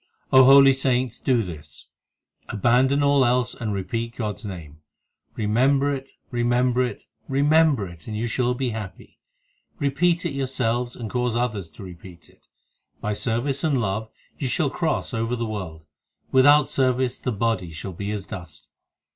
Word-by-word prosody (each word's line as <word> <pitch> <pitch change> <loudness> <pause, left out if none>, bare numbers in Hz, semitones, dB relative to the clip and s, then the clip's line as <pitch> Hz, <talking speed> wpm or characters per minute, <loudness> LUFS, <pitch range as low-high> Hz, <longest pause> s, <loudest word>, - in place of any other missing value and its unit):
5 130 - +7
O - - +9
holy 135 0 +8
saints, 130 -2 0
do 125 -4 +1
this 80 -6 -9 0.6
Abandon 125 +6 +2
all 140 -1 +4
else 125 0 +1
and 110 -3 -4
repeat 115 +5 -3
God 105 -3 -3
s - - -14
name; 80 -6 -8 0.6
Remember 135 +7 +2
it, 135 0 -7 0.2
remember 120 +1 +1
it, 125 -1 -3 0.2
remember 145 -4 +3
it, 85 -2 -13
and 105 -1 -4
you 115 - -2
shall 125 +1 0
be 125 -1 -2
happy; 105 -4 -8 0.6
Repeat 170 +4 +1
it 170 - -1
yourselves 125 -3 -2
and 115 - -6
cause 125 0 -1
others 110 -8 -2
to - - -12
repeat 90 -1 -12
it. - - -26 0.5
By 105 - -2
service 125 +6 -1
and 145 -5 +2
love 110 0 -2 0.3
you 135 - -1
shall 140 +2 0
cross 160 -4 -1
over 115 +1 -1
the 115 -1 -3
world; 90 -8 -6 0.5
Without 145 +2 +6
service 130 -1 0
the 125 - -2
body 105 -5 -1
shall 85 +4 -7
be 100 +4 -5
as 105 -2 -4
dust. 85 -7 -10
120 Hz, 165 wpm, -23 LUFS, 105-135 Hz, 0.6 s, O